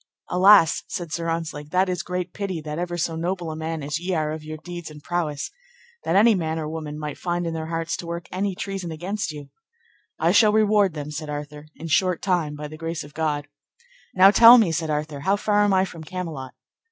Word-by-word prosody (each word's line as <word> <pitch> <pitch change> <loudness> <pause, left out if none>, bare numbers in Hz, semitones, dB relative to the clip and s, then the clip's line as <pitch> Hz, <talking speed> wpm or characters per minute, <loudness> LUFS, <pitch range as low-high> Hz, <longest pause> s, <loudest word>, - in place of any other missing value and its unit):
Alas, 185 -2 +6
said 170 -3 -5
Sir 165 +1 -2
Ontzlake, 160 -3 -4
that 185 +3 +2
is 180 -2 -1
great 180 +2 -4
pity 195 -5 -3
that 150 +1 -5
ever 175 0 -3
so 165 -1 -1
noble 170 0 -3
a - - -5
man 160 -1 -4
as 145 +3 -2
ye 180 +1 -2
are 155 -1 0
of 155 0 -6
your 155 0 -7
deeds 175 +1 -8
and 150 -1 -13
prowess, 160 -5 -2 0.5
that 170 - 0
any 220 +3 +6
man 160 -4 -1
or 155 -1 -3
woman 155 -1 -5
might 150 -2 -6
find 175 -1 -2
in 165 - -2
their 160 -1 -4
hearts 165 0 -2
to 170 - -7
work 170 +1 -5
any 190 +1 -2
treason 195 -3 -4
against 175 +2 -3
you. 145 -2 -10 0.7
I - - +2
shall 215 -2 +5
reward 210 -4 +3
them, 150 0 -5
said 155 0 -5
Arthur, 150 0 -6
in 165 - -8
short 180 +2 +1
time, 175 -6 0
by 150 0 -6
the 155 +1 -10
grace 165 0 -4
of 145 0 -13
God. 150 -2 -1 0.7
Now, 190 +1 +8
tell 230 +4 +9
me, 215 -8 +3
said 160 0 -2
Arthur, 150 -1 -2
how 190 +8 +2
far 205 0 +2
am 205 - +2
I 190 0 +3
from 165 -3 -9
Camelot? 160 -6 -6
165 Hz, 225 wpm, -24 LUFS, 155-185 Hz, 0.7 s, tell